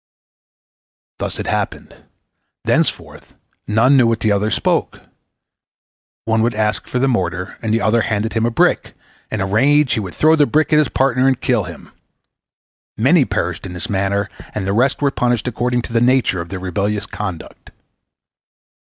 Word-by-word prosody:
Thus -, -, -3 dB
it -, -, -4 dB
happened. -, -, -3 dB, 0.7 s
Thenceforth -, -, -1 dB, 0.3 s
none 115 Hz, +6 st, +4 dB
knew 125 Hz, -3 st, +5 dB
what 115 Hz, -1 st, 0 dB
the 110 Hz, -, +2 dB
other 100 Hz, +1 st, +1 dB
spoke. -, -, -1 dB, 1.3 s
One 110 Hz, 0 st, +1 dB
would 115 Hz, 0 st, 0 dB
ask 105 Hz, 0 st, -1 dB
for -, -, -3 dB
the 135 Hz, +2 st, +2 dB
mortar, 90 Hz, -6 st, -2 dB
and 110 Hz, -, -2 dB
the 115 Hz, -, +1 dB
other 115 Hz, +2 st, +3 dB
handed 110 Hz, 0 st, -1 dB
him 115 Hz, -, 0 dB
a 120 Hz, -, +2 dB
brick; 115 Hz, -, +1 dB, 0.3 s
in 110 Hz, -, -3 dB
a -, -, 0 dB
rage, 135 Hz, +7 st, +3 dB
he 115 Hz, -, 0 dB
would 95 Hz, -4 st, -6 dB
throw 155 Hz, +1 st, +4 dB
the 145 Hz, -3 st, +3 dB
brick 155 Hz, +1 st, +1 dB
at 150 Hz, -, +6 dB
his 150 Hz, -, +2 dB
partner 130 Hz, -1 st, +2 dB
and 130 Hz, -2 st, +2 dB
kill 120 Hz, -7 st, 0 dB
him. -, -, -11 dB, 1.1 s
Many -, -, +4 dB
perished -, -, -3 dB
in 90 Hz, -, -8 dB
this 90 Hz, +6 st, -5 dB
manner, 100 Hz, +1 st, 0 dB, 0.3 s
and 105 Hz, -3 st, -2 dB
the 100 Hz, -, -1 dB
rest 130 Hz, +6 st, +1 dB
were 140 Hz, -, +3 dB
punished 120 Hz, -3 st, 0 dB
according 125 Hz, 0 st, -1 dB
to 120 Hz, -, -7 dB
the 115 Hz, -, +2 dB
nature 125 Hz, -7 st, +2 dB
of 85 Hz, -, -8 dB
their 95 Hz, -, -5 dB
rebellious 100 Hz, +3 st, -2 dB
conduct. 100 Hz, -7 st, -7 dB
115 Hz, 175 wpm, -18 LUFS, 100-125 Hz, 1.3 s, at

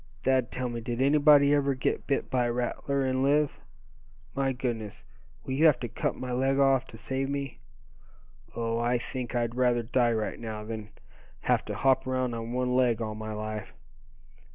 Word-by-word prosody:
Thad, 130 Hz, -2 st, +2 dB
tell 130 Hz, 0 st, -3 dB
me, 120 Hz, -1 st, -4 dB
did 120 Hz, +1 st, -4 dB
anybody 145 Hz, +1 st, +5 dB
ever 140 Hz, -2 st, +2 dB
get 130 Hz, -, -2 dB
bit 140 Hz, -, -1 dB
by 125 Hz, -2 st, +2 dB
a -, -, 0 dB
rattler, 135 Hz, +3 st, -1 dB
and 130 Hz, 0 st, 0 dB
live? 145 Hz, +2 st, +2 dB, 0.7 s
My 135 Hz, 0 st, 0 dB
goodness! 115 Hz, -5 st, -4 dB, 0.4 s
will 130 Hz, -, -4 dB
you 155 Hz, +5 st, +5 dB
have 140 Hz, -6 st, +4 dB
to 120 Hz, -, -2 dB
cut -, -, -2 dB
my 125 Hz, -1 st, -5 dB
leg 135 Hz, +2 st, +1 dB
off, 135 Hz, -1 st, +4 dB
to 115 Hz, -, -12 dB
save 130 Hz, +4 st, -3 dB
me? 140 Hz, -2 st, -4 dB, 1.0 s
Oh! 115 Hz, 0 st, -1 dB
I 120 Hz, +1 st, +2 dB
think 125 Hz, 0 st, -5 dB
I'd 120 Hz, -1 st, 0 dB
rather 120 Hz, -1 st, +2 dB
die 120 Hz, +1 st, +2 dB
right 110 Hz, -1 st, -2 dB
now, 110 Hz, -2 st, -5 dB
than 110 Hz, -1 st, -6 dB, 0.5 s
have -, -, +2 dB
to -, -, -4 dB
hop 130 Hz, -1 st, +2 dB
around 130 Hz, -1 st, 0 dB
on 115 Hz, 0 st, -5 dB
one 125 Hz, 0 st, 0 dB
leg 125 Hz, -3 st, +3 dB
all 110 Hz, -2 st, -3 dB
my 110 Hz, 0 st, -6 dB
life. 110 Hz, 0 st, -5 dB
125 Hz, 185 wpm, -28 LUFS, 115-135 Hz, 1.0 s, anybody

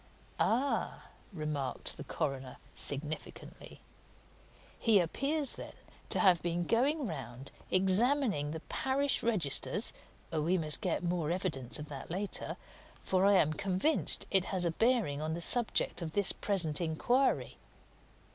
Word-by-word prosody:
"Ah!" 265 Hz, +5 st, 0 dB, 0.2 s
remarked 150 Hz, -7 st, -3 dB
the -, -, -7 dB
coroner 130 Hz, -2 st, -4 dB, 0.2 s
significantly. 150 Hz, +2 st, -4 dB, 1.0 s
"He 220 Hz, -4 st, +4 dB
appears, 275 Hz, -, -1 dB
then, -, -, -9 dB, 0.4 s
to -, -, 0 dB
have 185 Hz, -5 st, +5 dB
been 175 Hz, 0 st, -1 dB
going 270 Hz, -, +1 dB
round 135 Hz, -, -7 dB, 0.2 s
examining 195 Hz, -, +2 dB
the 160 Hz, +1 st, -5 dB
parish 270 Hz, +7 st, 0 dB
registers 190 Hz, -, +1 dB, 0.4 s
we 165 Hz, +4 st, +1 dB
must 155 Hz, +1 st, -2 dB
get 180 Hz, -4 st, -1 dB
more 170 Hz, -3 st, -1 dB
evidence 165 Hz, -9 st, -1 dB
of 150 Hz, 0 st, -7 dB
that 140 Hz, -2 st, -8 dB
later, 190 Hz, +4 st, -4 dB, 0.5 s
for 190 Hz, +1 st, +2 dB
I'm 185 Hz, -6 st, +4 dB
convinced 195 Hz, -, +1 dB
it 190 Hz, -2 st, +5 dB
has 185 Hz, -2 st, -1 dB
a 170 Hz, -, +1 dB
bearing 225 Hz, -, +1 dB
on 155 Hz, +1 st, -2 dB
the 170 Hz, -, -3 dB
subject 230 Hz, +2 st, +2 dB
of 160 Hz, -2 st, -5 dB
this 200 Hz, -2 st, +5 dB
present 180 Hz, -6 st, 0 dB
inquiry. 240 Hz, +12 st, +1 dB
180 Hz, 130 wpm, -32 LUFS, 155-225 Hz, 1.0 s, have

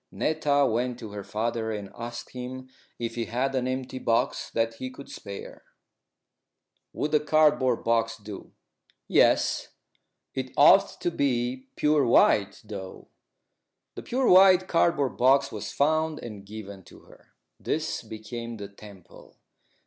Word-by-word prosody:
Netta 145 Hz, -2 st, +1 dB
went 125 Hz, 0 st, -1 dB
to 110 Hz, -4 st, -9 dB
her 100 Hz, -1 st, -6 dB
father 110 Hz, +1 st, -2 dB
and 105 Hz, -2 st, -6 dB
asked 120 Hz, 0 st, -7 dB
him 130 Hz, +1 st, -7 dB, 0.3 s
if 115 Hz, -1 st, -4 dB
he 115 Hz, -1 st, -3 dB
had 125 Hz, +5 st, -1 dB
an 130 Hz, -1 st, 0 dB
empty 130 Hz, 0 st, -4 dB
box 115 Hz, -2 st, 0 dB
that 115 Hz, 0 st, 0 dB
he 130 Hz, -, -5 dB
could 140 Hz, +2 st, -12 dB
spare. 100 Hz, -1 st, -9 dB, 1.3 s
"Would 150 Hz, +1 st, -3 dB
a 150 Hz, -, +5 dB
cardboard 150 Hz, -5 st, +3 dB
box 115 Hz, 0 st, +1 dB
do?" 105 Hz, -2 st, -10 dB, 0.6 s
"Yes. -, -, +3 dB, 0.7 s
It 130 Hz, -1 st, -4 dB
ought 195 Hz, +7 st, +6 dB
to 175 Hz, -, 0 dB
be 130 Hz, -3 st, -1 dB
pure 150 Hz, -1 st, +3 dB
white, 100 Hz, -4 st, +3 dB
though." 100 Hz, -3 st, -9 dB, 0.8 s
The -, -, -7 dB
pure 255 Hz, +1 st, -1 dB
white 185 Hz, 0 st, +7 dB
cardboard 165 Hz, -6 st, +1 dB
box 135 Hz, +2 st, +4 dB
was 105 Hz, -1 st, -6 dB
found 155 Hz, +2 st, +1 dB
and 105 Hz, -4 st, -9 dB
given 100 Hz, -2 st, -9 dB
to -, -, -16 dB
her. -, -, -21 dB, 0.2 s
This -, -, -2 dB
became 115 Hz, +2 st, -7 dB
the 100 Hz, -1 st, -7 dB
temple. 100 Hz, -2 st, -15 dB
125 Hz, 140 wpm, -26 LUFS, 110-140 Hz, 1.3 s, white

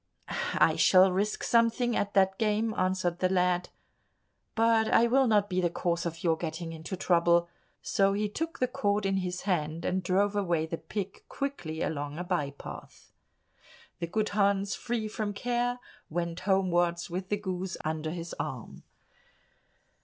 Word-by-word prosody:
"I -, -, +4 dB
shall 185 Hz, 0 st, +6 dB
risk 200 Hz, +3 st, -1 dB
something 235 Hz, +1 st, +2 dB
at 205 Hz, 0 st, -1 dB
that 190 Hz, 0 st, +3 dB
game," 220 Hz, 0 st, +1 dB
answered 185 Hz, -2 st, 0 dB
the 185 Hz, -, +2 dB
lad, 180 Hz, -1 st, +1 dB, 0.9 s
"but 225 Hz, -1 st, +3 dB
I 235 Hz, -, +5 dB
will 260 Hz, +2 st, +3 dB
not 210 Hz, -2 st, +3 dB
be 185 Hz, -2 st, 0 dB
the 175 Hz, -, +2 dB
cause 170 Hz, 0 st, -1 dB
of 165 Hz, 0 st, -7 dB
your 165 Hz, -2 st, +3 dB
getting 165 Hz, 0 st, -5 dB
into 165 Hz, +4 st, -6 dB
trouble." 170 Hz, -1 st, +3 dB, 0.4 s
So 195 Hz, 0 st, +2 dB
he 210 Hz, +1 st, 0 dB
took 325 Hz, +10 st, -4 dB
the 255 Hz, -, +1 dB
cord 205 Hz, -4 st, 0 dB
in 195 Hz, 0 st, +1 dB
his 180 Hz, -1 st, -3 dB
hand, 165 Hz, -4 st, -1 dB
and 185 Hz, +1 st, 0 dB
drove 200 Hz, +3 st, +1 dB
away 175 Hz, -6 st, +1 dB
the 165 Hz, +1 st, -5 dB
pig 195 Hz, +4 st, -5 dB
quickly 175 Hz, -, -4 dB
along 145 Hz, -1 st, -3 dB
a 180 Hz, -, -3 dB
by 175 Hz, -6 st, -1 dB
path. 140 Hz, -, -11 dB, 0.9 s
The 170 Hz, -, -2 dB
good 215 Hz, +5 st, -1 dB
Hans, 200 Hz, -1 st, +1 dB
free 235 Hz, -3 st, -2 dB
from 210 Hz, -2 st, -3 dB
care, 245 Hz, +2 st, 0 dB, 0.3 s
went 170 Hz, +1 st, -3 dB
homewards 175 Hz, -2 st, +1 dB
with 185 Hz, +2 st, -4 dB
the 205 Hz, -, +1 dB
goose 190 Hz, -2 st, -4 dB
under 155 Hz, 0 st, -2 dB
his 170 Hz, +1 st, -5 dB
arm. -, -, -5 dB
185 Hz, 160 wpm, -29 LUFS, 170-210 Hz, 0.9 s, shall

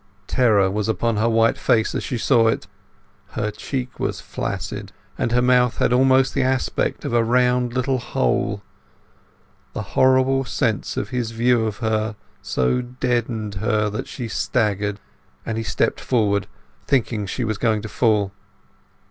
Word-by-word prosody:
Terror 105 Hz, -6 st, +3 dB
was 105 Hz, +1 st, -1 dB
upon 110 Hz, +2 st, 0 dB
her 110 Hz, +2 st, +2 dB
white 115 Hz, 0 st, +3 dB
face 110 Hz, -1 st, +2 dB
as -, -, -2 dB
she 125 Hz, -, -3 dB
saw 115 Hz, -1 st, +3 dB
it; 110 Hz, -, 0 dB, 0.7 s
her 105 Hz, 0 st, -2 dB
cheek 130 Hz, +3 st, -5 dB
was -, -, -2 dB
flaccid, -, -, -5 dB, 0.2 s
and 115 Hz, -, -1 dB
her 125 Hz, +1 st, +3 dB
mouth 125 Hz, -1 st, +3 dB
had -, -, +2 dB
almost 130 Hz, +1 st, +4 dB
the 135 Hz, -, +1 dB
aspect 130 Hz, 0 st, -1 dB
of -, -, -2 dB
a 120 Hz, -1 st, +4 dB
round 125 Hz, +1 st, +2 dB
little 130 Hz, +1 st, 0 dB
hole. 100 Hz, -, -1 dB, 1.1 s
The -, -, -4 dB
horrible 130 Hz, +1 st, +4 dB
sense 110 Hz, -4 st, -1 dB
of 100 Hz, -, -2 dB
his 120 Hz, -2 st, -2 dB
view 115 Hz, 0 st, +2 dB
of 105 Hz, -1 st, -4 dB
her 110 Hz, -1 st, 0 dB, 0.3 s
so 65 Hz, -, 0 dB
deadened 120 Hz, -3 st, -2 dB
her 110 Hz, -2 st, +1 dB
that 105 Hz, -, -4 dB
she 120 Hz, -4 st, -5 dB
staggered, 105 Hz, -1 st, -1 dB, 0.5 s
and 115 Hz, -, -2 dB
he 115 Hz, -, -2 dB
stepped -, -, 0 dB
forward, 105 Hz, -5 st, +1 dB, 0.4 s
thinking 115 Hz, -6 st, 0 dB
she 125 Hz, -, -3 dB
was 110 Hz, -2 st, -2 dB
going 110 Hz, -3 st, +1 dB
to -, -, -4 dB
fall. 105 Hz, -1 st, +1 dB
115 Hz, 155 wpm, -22 LUFS, 105-125 Hz, 1.1 s, almost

